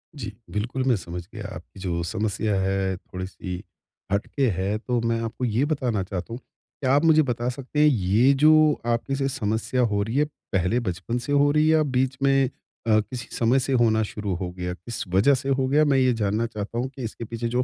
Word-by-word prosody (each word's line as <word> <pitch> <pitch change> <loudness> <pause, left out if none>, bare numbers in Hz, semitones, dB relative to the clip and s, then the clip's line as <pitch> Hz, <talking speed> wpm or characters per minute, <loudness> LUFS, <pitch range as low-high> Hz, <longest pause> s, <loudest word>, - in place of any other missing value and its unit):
जी, 110 -7 -5 0.2
बिल्कुल, 120 +5 -2
मैं 130 -3 +3
समझ 90 -2 -6
गया, 105 -2 -6
आपकी 85 +4 -12
जो 85 -3 -2
समस्या 105 +2 -1
है, 95 0 0
थोड़ी-सी 95 0 -7 0.5
हटके 125 +6 0
है। 95 +3 -1
तो 120 +1 -1
मैं 115 0 0
आपको 115 +2 -3
ये 120 +5 +1
बताना 125 -10 -1
चाहता 95 +4 -5
हूँ, 120 - -5 0.4
क्या 130 0 +2
आप 145 - +3
मुझे 155 -1 +6
बता 120 -1 -1
सकते 135 +3 -4
हैं, 150 - +6
ये 115 +2 +4
जो 155 +1 +5
आपके 120 +4 0
साथ 135 0 0
समस्या 110 +4 0
हो 105 -4 +1
रही 115 +4 -4
है, 150 - +4 0.3
पहले 95 +6 +2
बचपन 100 +3 -3
से - - -2
हो 145 0 +4
रही 150 +1 +3
है 160 - +5
या 155 - +4
बीच 130 -1 0
में 135 -1 +3 0.4
अ, 110 -1 +5
किसी 120 +3 -5
समय 120 +3 +3
से 135 +1 -1
होना 110 -2 +3
शुरू 105 -2 -4
हो 90 0 -4
गया? 90 0 -4
किस 115 +6 -6
वजह 125 +9 +5
से 135 +2 -3
हो 130 -1 +1
गया, 150 +3 +4
मैं 140 -2 +3
ये 130 -1 +4
जानना 105 +3 +1
चाहता 110 0 -5
हूँ 125 +2 0
कि 130 - -6
इसके 115 +1 -5
पीछे 115 +1 -4
जो 125 +2 +1
115 Hz, 220 wpm, -24 LUFS, 100-130 Hz, 0.5 s, मुझे